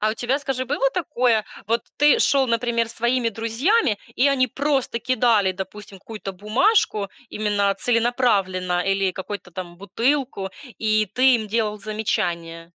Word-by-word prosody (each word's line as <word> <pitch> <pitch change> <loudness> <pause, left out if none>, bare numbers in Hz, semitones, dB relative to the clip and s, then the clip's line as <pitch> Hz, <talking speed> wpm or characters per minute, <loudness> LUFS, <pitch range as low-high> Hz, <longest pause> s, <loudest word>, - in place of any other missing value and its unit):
А 215 - +2
у - - -3
тебя, 245 +4 -1
скажи, 270 -3 -3
было 275 +1 +1
такое: 250 - +1 0.2
вот 230 +2 +1
ты 295 -1 +5
шёл, 270 0 +3
например, 235 -1 0
с - - -10
своими 240 0 +1
друзьями, 230 - +1 0.2
и 275 +3 +3
они 260 -2 +2
просто 270 -2 -1
кидали, 225 -5 +2
допустим, 195 +1 -8
какую-то 205 0 -7
бумажку 215 - +1 0.2
именно 205 -2 0
целенаправленно 200 -7 +1
или 195 -1 +1
какую-то 190 0 -7
там 175 0 -8
бутылку, 225 +2 -1 0.3
и 215 -1 +2
ты 255 0 +5
им 220 -2 -5
делал 215 -1 -1
замечание? 170 -6 -3
225 Hz, 145 wpm, -22 LUFS, 200-255 Hz, 0.3 s, ты